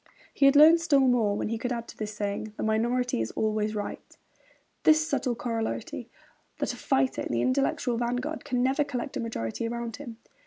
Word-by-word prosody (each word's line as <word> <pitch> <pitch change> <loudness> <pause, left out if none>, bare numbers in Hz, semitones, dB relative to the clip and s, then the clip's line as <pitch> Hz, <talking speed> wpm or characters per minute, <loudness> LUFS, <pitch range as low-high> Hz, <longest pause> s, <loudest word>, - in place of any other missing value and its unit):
He 275 - +4
had 275 - +5
learned 320 +3 +8
still 290 -5 +4
more 235 -6 +3
when - - -2
he 230 0 -2
could 250 +1 -3
add 235 -1 -3
to - - -10
his 210 -1 -3
saying, 210 +1 -4
'The - - -3
minority 235 - +1
is 110 - -2
always 215 0 0
right,' 205 -1 -6 0.6
this 310 0 +4
subtle 260 -4 0
corollary, 225 - -4 0.5
that - - -2
a - - -7
fighter 135 -1 0
in - - -4
the 120 0 +1
intellectual 255 -2 +1
vanguard 245 +6 -2
can 245 -1 0
never 270 +3 +2
collect 255 -4 -5
a - - -3
majority 225 - -3
around 235 -1 -4
him. 245 -6 -9
235 Hz, 195 wpm, -27 LUFS, 215-265 Hz, 0.6 s, learned